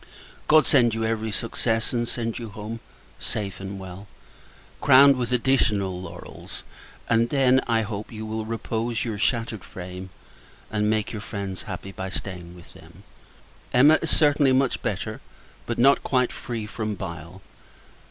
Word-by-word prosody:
God 155 0 +6
send 120 -5 +4
you 110 0 -1
every 110 0 -1
success; 115 +2 -1
and 120 -1 0
send 115 -1 -2
you 115 -2 -6
home, 105 +3 -6 0.4
safe 100 -3 -3
and 95 0 -6
well, 95 +1 -9 0.7
crowned 140 0 +7
with 125 -1 -2
additional 105 -7 +2
laurels! - - -8 0.4
And 115 +1 +3
then, 130 -2 +4
I 115 -1 +2
hope, 105 0 -5
you 110 -1 -6
will 110 0 -3
repose 115 +1 -2
your 110 -3 -3
shattered 115 -3 0
frame; 90 +1 -8 0.6
and 105 0 +1
make 110 -1 0
your 110 - -5
friends 100 -3 -5
happy, 95 +1 -6
by 95 0 -5
staying 90 -2 -5
with 85 - -15
them. - - -16 0.7
Emma 140 +5 +7
Emma - - +4
is 165 - -1
certainly 145 -3 +4
much 130 -1 +2
better, - - -3 0.5
but 120 - -2
not 135 +4 +5
quite 125 -2 +1
free 115 -3 -5
from 105 0 -3
bile. 85 0 -8
110 Hz, 155 wpm, -25 LUFS, 100-120 Hz, 0.7 s, crowned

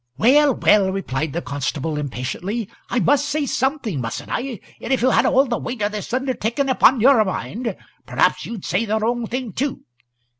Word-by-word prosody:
"Well, 275 - +5
well," 200 -3 +4
replied 160 -6 -2
the 170 +3 -3
constable, 145 +2 -3
impatiently, 150 - -4 0.2
"I 245 - +1
must 285 +3 +2
say 295 0 0
something, 260 - -1
mustn't 115 -1 -5
I? 245 -4 -3 0.2
And - - -5
if 260 -3 +2
you 255 - +4
had - - +3
all 270 +2 +4
the 240 -3 -2
weight 240 -3 -4
o' 205 - +2
this 210 0 -6
undertaking 260 0 -1
upon 255 -2 +4
your 250 -2 +6
mind 215 +3 -4 0.3
perhaps - - +2
you'd 230 -5 -7
say 185 +7 0
the 220 0 0
wrong 230 +1 -1
thing 245 -3 -4
too. 280 +1 -2
230 Hz, 185 wpm, -21 LUFS, 190-260 Hz, 0.3 s, your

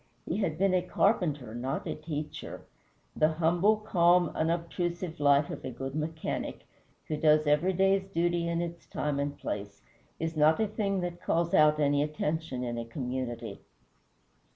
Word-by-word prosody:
He - - -2
had 175 -7 -1
been 195 +1 +2
a 185 - +3
carpenter, 170 - 0
not 130 +3 -3
a - - -2
teacher. 155 -1 -6 0.5
The 155 +1 +3
humble, 175 +6 +3
calm, 175 -4 +3
unobtrusive 170 +1 -2
life 145 0 +4
of - - -7
a - - -4
good 135 +2 -6
mechanic, 155 +1 -4 0.4
who 155 - -1
does 155 0 +4
every 150 +6 +3
day's 195 +1 +2
duty 175 -2 0
in 170 0 0
its 170 0 -6
time 145 -1 -2
and 145 0 -2
place, 100 0 -5 0.4
is 165 0 -2
not 155 +1 +4
a 220 - +3
thing 200 -2 -1
that 175 -1 -4
calls 170 0 0
out 150 0 +5
any 145 -1 +3
attention 150 -2 -2
in 120 -1 -3
a 115 - -4
community. 125 0 -5
160 Hz, 160 wpm, -29 LUFS, 145-175 Hz, 0.5 s, out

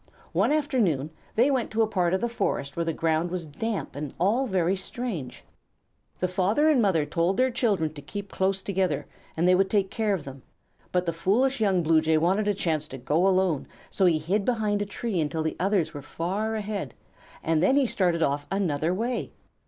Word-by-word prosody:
One - - +2
afternoon 225 - +1 0.2
they 250 +6 +4
went 260 -4 0
to 225 +1 +2
a - - +1
part 185 -4 +1
of 190 - -2
the 235 - +1
forest 140 -11 -2
where 170 - 0
the 165 - -1
ground 165 +1 0
was 175 -1 -4
damp 200 +7 -4
and 145 -1 -5
all 225 +9 +2
was 190 -1 +1
strange. 225 - -5 0.8
The 180 - +1
father 190 +11 +2
and 295 -6 +4
mother 180 -8 +2
told 170 +6 0
their 260 0 +3
children 205 -11 0
to 145 - -9
keep 200 +7 -7
close 190 0 0
together 185 -7 0 0.3
and 170 +2 +2
they 180 - +6
would 190 +1 +3
take 200 -2 +1
care 220 -3 +1
of 170 - -6
them; 135 -1 -9 0.5
but 180 0 +1
the 170 - -1
foolish 220 +10 +1
young 190 -4 +2
Blue 160 0 +4
Jay 160 0 +2
wanted 190 +6 +2
a 205 - +2
chance 155 -5 -1
to 135 - -8
go 150 +9 +1
alone, 185 -6 +1 0.2
so 190 - +3
he 165 -3 +4
hid 185 +7 0
behind 210 -3 0
a 205 - -2
tree 205 -3 -2
until 155 +1 -1
the 160 - -2
others 190 -3 +1
were 145 - -6
far 195 +9 -2
ahead, 205 - -4 0.5
and 160 -1 +1
then 190 +10 +4
he 280 -1 +4
started 175 -7 +1
off 145 0 -1
another 175 -3 0
way. 235 +5 -2
185 Hz, 205 wpm, -26 LUFS, 160-215 Hz, 0.8 s, they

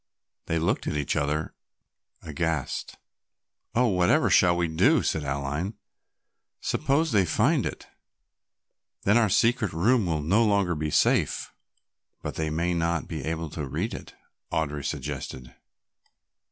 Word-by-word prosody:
They 85 - 0
looked 80 +1 0
at 75 - -1
each 70 -3 -1
other 75 +2 -1 0.7
aghast. 80 -2 -3 0.8
"Oh, 125 +2 +4
whatever 90 -5 +3
shall 85 -1 +5
we 85 -1 +1
do?" 80 0 +3
said 80 - -1
Aline. 70 +8 -3 0.8
"Suppose 150 +3 0
that 105 - +4
they 95 - +3
find 80 - +2
it, - - -7 1.2
then 105 - +3
our 115 -3 +4
secret 115 -2 +2
room 105 +5 +2
will 80 -3 -1
be - - -7
no 105 +7 +4
longer 90 -8 +1
safe." - - +1 0.7
"But - - -4
they 80 -1 -2
may 85 +3 0
not 85 -1 -1
be 80 -5 -5
able 80 +1 -3
to 75 -4 -4
read 65 - -3
it," - - -9 0.4
Audry 75 -2 -1
suggested. 65 -3 -5
80 Hz, 140 wpm, -26 LUFS, 75-95 Hz, 1.2 s, shall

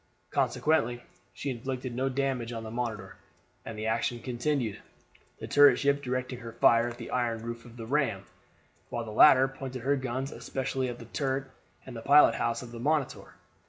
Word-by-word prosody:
Consequently 120 -6 +1 0.3
she 140 - -4
inflicted 130 +1 -4
no 130 +2 0
damage 130 -3 -1
on 115 -1 -5
the 110 - -7
Monitor, 120 -2 -4 0.5
and 115 - -7
the 110 - -4
action 115 +2 0
continued, 125 -2 -2 0.6
the - - -6
turret 145 0 +6
ship 140 0 +1
directing 125 -1 -3
her 115 -2 -8
fire 115 0 +4
at 120 0 -6
the 115 - -8
iron 115 -3 -1
roof 115 0 -6
of 120 0 -13
the 115 - -6
ram, 120 -7 0 0.7
while 120 -1 -3
the 110 - -7
latter 130 +4 +7
pointed 130 -2 -7
her 140 +2 +2
guns 130 +1 -3
especially 130 -1 -3
at 120 - -6
the 120 - -10
turret 135 +2 -2 0.3
and 120 -3 -8
pilot 140 -3 +7
house 115 +2 -1
of 120 - -10
the 120 - -8
Monitor. 145 +1 -1
125 Hz, 180 wpm, -29 LUFS, 115-135 Hz, 0.7 s, latter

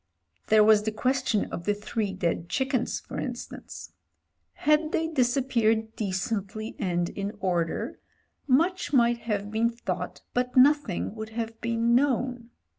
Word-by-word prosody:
There 215 0 +6
was 215 -1 +6
the 220 +1 -2
question 250 -1 0
of 170 - -5
the 205 - +1
three 210 0 -2
dead 175 -2 -2
chickens, 265 -2 0
for - - -7
instance. - - -7 0.6
Had 305 +1 +2
they 320 - 0
disappeared 240 -6 +1
decently 205 +2 -3
and 175 -2 0
in 200 +1 -4
order 175 -3 -1 0.5
much 330 +5 +2
might 235 -2 +4
have 210 -3 -3
been 225 +2 +2
thought 235 0 -5
but 250 +1 -1
nothing 270 -9 +4
would 220 -1 -6
have 225 -1 -4
been 230 0 +1
known. 250 -2 +1
225 Hz, 135 wpm, -27 LUFS, 205-255 Hz, 0.6 s, There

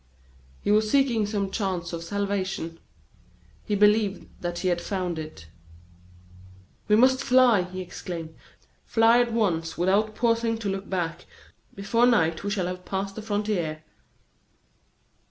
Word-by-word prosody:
He - - +1
was 215 +1 +3
seeking 240 -5 +2
some 200 -2 -2
chance 185 -5 -2
of 165 0 -4
salvation; 190 -3 -3 0.8
he 210 - -1
believed 210 -1 +3 0.2
that 175 0 -3
he 185 - 0
had 175 -1 0
found 180 -5 -3
it. 155 - -9 1.4
"We 210 - +5
must 260 +4 +4
fly!" 250 -6 +5
he 185 +1 -6
exclaimed: 170 -2 -7 0.5
"fly 230 +1 +4
at 240 -1 -1
once 175 -8 0
without 200 +5 +1
pausing 230 -1 +1
to 215 -3 -3
look 195 0 -4
back. 170 -4 -3 0.5
Before 230 +5 +2
night 165 -9 +2
we 205 - -2
shall 200 -3 -1
have 180 0 -5
passed 195 +1 -3
the 220 - -7
frontier." 205 -7 -2
200 Hz, 135 wpm, -26 LUFS, 175-220 Hz, 1.4 s, We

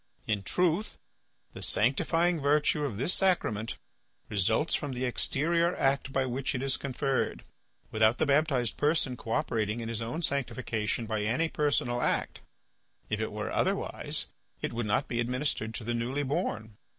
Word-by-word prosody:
In 105 -2 0
truth, 180 - +1 0.6
the - - -8
sanctifying 165 +8 +2
virtue 150 +1 +3
of 115 -8 -3
this 135 - +1
sacrament 115 - +1 0.5
results 110 - +2
from 145 -3 -1
the 125 +1 -2
exterior 170 +7 +1
act 135 0 +1
by 135 0 +1
which 130 +2 -1
it 130 - -2
is 135 -2 +2
conferred, 135 0 -1 0.5
without 110 +2 +4
the - - +2
baptized 140 -5 +2
person 145 -4 +2
cooperating 110 -1 -1
in 115 -1 -4
his 115 -1 -3
own 120 +9 -3
sanctification 120 -6 -1
by 110 -1 -1
any 125 +10 +1
personal 130 -6 +1
act; - - 0 0.7
if - - 0
it - - -2
were - - -4
otherwise - - 0 0.3
it - - -3
would 115 -1 -2
not 105 +6 +1
be 120 - -2
administered 125 -2 -1
to - - -4
the 120 +2 -1
newly 125 +5 -1
born. 110 -6 -2
130 Hz, 155 wpm, -30 LUFS, 115-145 Hz, 0.7 s, without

